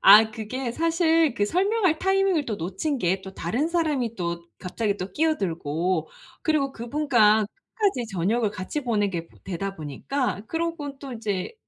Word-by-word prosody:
아. 215 +2 +9
그게 235 +3 -4
사실 330 -1 +3
그 205 - +1
설명할 370 - +2
타이밍을 385 -5 +2
또 215 -3 -2
놓친 195 - -2
게 185 -2 +1
또 190 0 -9
다른 240 - -1
사람이 300 -9 0
또 170 -1 -3
갑자기 200 +2 -1
또 185 -1 -5
끼어들고 175 - 0 0.3
그리고 290 -4 +1
그분과 235 -4 +3
끝까지 385 - -2
저녁을 210 +5 +1
같이 205 +9 -4
보내게 205 -8 0
보 - - -21
되다 195 +1 -4
보니까 200 - -2
그러고 325 -2 -3
또 270 -2 -7
이제 210 -5 -3
230 Hz, 315 characters per minute, -25 LUFS, 190-310 Hz, 0.3 s, 아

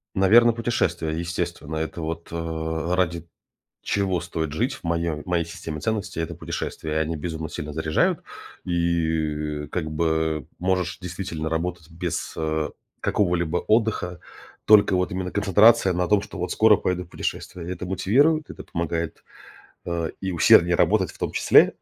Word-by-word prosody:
Наверно, 115 +5 +6
путешествия, 115 -8 -1
естественно. 80 -2 -3
Это 80 +2 -3
вот, 80 +1 -4
э, 80 0 -2
ради 85 -2 0 0.6
чего 95 -3 0
стоит 80 -4 -3
жить 120 - 0
в - - -15
моём 85 -2 -1
в - - -29
моей 85 -2 +1
системе 80 -2 -7
ценностей, 105 -6 -2
это 80 - -4
путешествия. 80 -1 -4
И - - -2
они 80 +1 -1
безумно 80 0 -4
сильно 75 0 -6
заряжают, 80 0 +1 0.4
и, 80 -3 -1
э, - - -14
как 80 -3 -3
бы, 80 -2 0
э, - - -38
можешь 90 -1 0
действительно 85 -3 -4
работать 85 0 -3
без, 85 0 -4
а, 80 -1 -1 0.3
какого-либо 90 -4 +1
отдыха. 105 -5 0 0.5
Только 105 -3 +6
вот 90 0 0
именно 90 0 -3
концентрация 105 +1 +5
на 90 0 0
том, 105 -1 +3
что 105 -1 -9
вот 90 0 -3
скоро 110 -2 +6
поеду 90 0 -1
в 85 - -18
путешествие. 85 -1 -5
И - - -4
это 90 - -6
мотивирует, 130 - +2
это - - -9
помогает, 85 -1 -3 0.7
а, 85 -1 -1
и 95 - -2
усерднее 85 +1 +6
работать - - +3
в - - -16
том - - -2
числе. - - +5
85 Hz, 160 wpm, -24 LUFS, 80-95 Hz, 0.7 s, Наверно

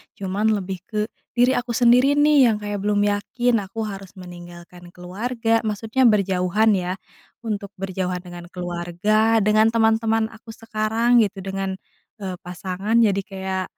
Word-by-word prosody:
Cuman 200 +3 0
lebih 190 -2 -3
ke 215 0 -3 0.3
diri 250 +2 +3
aku 245 -1 -3
sendiri 250 +3 +5
nih, 290 -3 +5
yang 215 - 0
kayak 205 -1 -4
belum 205 0 +2
yakin 210 +4 0
aku 195 +3 -6
harus 195 -2 -7
meninggalkan 175 0 -12
keluarga 225 +6 -1
maksudnya 220 +4 0
berjauhan 195 0 +2
ya. 180 0 -2 0.5
Untuk 205 -3 -4
berjauhan 185 -1 -3
dengan 175 -1 -10
keluarga, 180 +6 0
dengan 215 +2 +4
teman-teman 225 0 +2
aku 225 +1 -16
sekarang, 225 +2 +1
gitu, 200 -1 -6
dengan, 195 0 -3 0.4
eee, 185 -2 -4
pasangan, 185 +4 -3
jadi 200 -2 +2
kayak 190 -1 -4
205 Hz, 140 wpm, -22 LUFS, 185-225 Hz, 0.5 s, sendiri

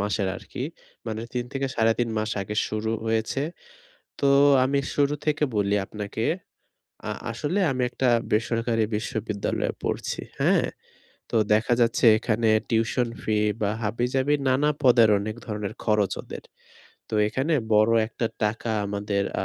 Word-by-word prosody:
মাসের 100 -1 0
আরকি। - - -6 0.4
মানে 110 0 -3
৩ 125 -1 -2
থেকে 135 0 -1
৩.৫ 115 +1 +2
মাস 110 +1 -1
আগে 105 +2 -5
শুরু 110 +1 -2
হয়েছে। 110 +4 0 0.8
তো 140 - +2 0.4
আমি 140 +2 +1 0.2
শুরু 145 0 +2
থেকে 150 0 +1
বলি 100 0 +2
আপনাকে 105 +2 -5 0.9
আ - - -1 0.2
আসলে 145 - -2
আমি 130 -1 -1
একটা 130 - 0 0.2
বেসরকারি 115 +1 +1
বিশ্ববিদ্যালয়ে 105 -1 -2
পড়ছি। - - -2 0.2
হ্যাঁ? - - +3 0.7
তো - - 0 0.2
দেখা 110 +3 +2
যাচ্ছে 115 +1 +2
এখানে 110 0 0 0.2
টিউশন 115 +2 +1
ফি 110 -1 0 0.2
বা 105 -2 +1
হাবিজাবি 125 +6 0
নানা 140 +3 +3
পদের 120 -3 +6
অনেক 105 +2 -4
ধরনের 105 -2 -4
খরচ 105 -3 +2
ওদের। - - -9 0.7
তো - - -4
এখানে 135 +8 -1 0.2
বড় 110 +1 +5 0.2
একটা 115 0 -2 0.2
টাকা 110 +2 -1 0.2
আমাদের 100 0 -1 0.2
আ - - -2
115 Hz, 140 wpm, -25 LUFS, 105-125 Hz, 0.9 s, পদের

